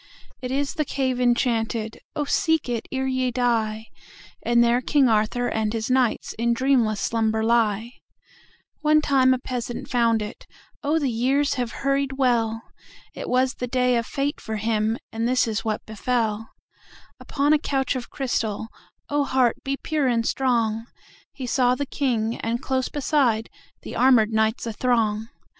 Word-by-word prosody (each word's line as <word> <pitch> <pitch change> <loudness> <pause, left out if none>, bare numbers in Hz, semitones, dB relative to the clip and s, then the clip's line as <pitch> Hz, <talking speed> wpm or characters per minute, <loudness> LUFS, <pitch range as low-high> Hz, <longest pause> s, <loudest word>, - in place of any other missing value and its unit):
It 250 - -4
is 275 +2 -1
the 315 -4 0
cave 260 -3 -1
enchanted(Oh, 235 +2 -1
seek 320 0 +1
it 235 -2 -3
ere 265 0 -1
ye 260 -1 0
die!)And 235 0 -1
there 235 +1 +3
King 275 +1 +3
Arthur 225 +2 +1
and 220 -1 -1
his 225 0 -2
knightsIn 235 -2 +1
dreamless 240 -5 +2
slumber 220 0 0
lie. 225 -1 +1 0.9
One 305 0 +4
time 265 -3 +3
a 255 - +3
peasant 245 -1 -5
found 230 -3 +2
it(Oh, 285 +7 -5
the 280 -5 0
years 270 +5 +1
have 245 -3 -2
hurried 275 0 +1
well!)It 230 -4 -3
was 255 +1 +2
the 250 - -5
day 250 0 +2
of 235 -1 -1
fate 285 +1 -2
for 220 -2 -4
him, 220 +1 0
And 225 +1 -1
this 250 -1 +2
is 215 -2 -2
what 215 -1 -2
befell:Upon 225 +5 -3
a 305 - +4
couch 270 -2 -1
of 250 -2 -5
crystal(Oh, 225 +1 -3
heart 255 -3 +2
be 275 0 -2
pure 300 -3 -1
and 230 -2 +1
strong!)He 235 +1 -2
saw 250 0 +2
the 285 - -2
King, 235 -5 -1
and, 230 +1 -2
close 260 0 -1
beside, 260 -6 +1 0.3
The - - -7
armored 245 -4 +4
knights 220 +2 +1
athrong. 225 -2 0
245 Hz, 145 wpm, -24 LUFS, 225-265 Hz, 0.9 s, One